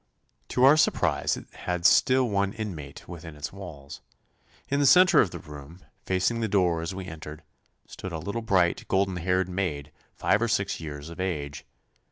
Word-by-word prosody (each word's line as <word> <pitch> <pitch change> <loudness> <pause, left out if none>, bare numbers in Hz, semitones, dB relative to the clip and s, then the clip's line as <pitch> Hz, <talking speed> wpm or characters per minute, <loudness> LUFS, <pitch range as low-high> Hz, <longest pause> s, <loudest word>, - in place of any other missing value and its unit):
To 125 - 0
our 140 +4 +7
surprise - - +1
it - - -10
had 90 -1 -4
still 130 +5 +5
one 100 -2 0
inmate 85 -11 -7
within 85 -2 -9
its 75 +4 -6
walls. 80 -8 -10 0.7
In 140 - 0
the 145 - +4
centre 185 +5 +7
of 95 - +1
the - - -7
room, 75 +3 -11 0.3
facing 95 +5 +1
the 115 - 0
door 90 -5 +2
as 85 +3 -4
we 95 -1 -6
entered, 80 -2 -9 0.4
stood 95 - -8
a 80 - -3
little 100 +9 -4
bright, 95 -6 +1
golden 95 -1 +1
haired 90 +1 0
maid, 85 -6 -3 0.2
five 105 - +1
or 120 - +2
six 100 -3 -1
years 75 -1 -7
of 85 - -11
age. 75 -7 -3
90 Hz, 180 wpm, -27 LUFS, 80-100 Hz, 0.7 s, our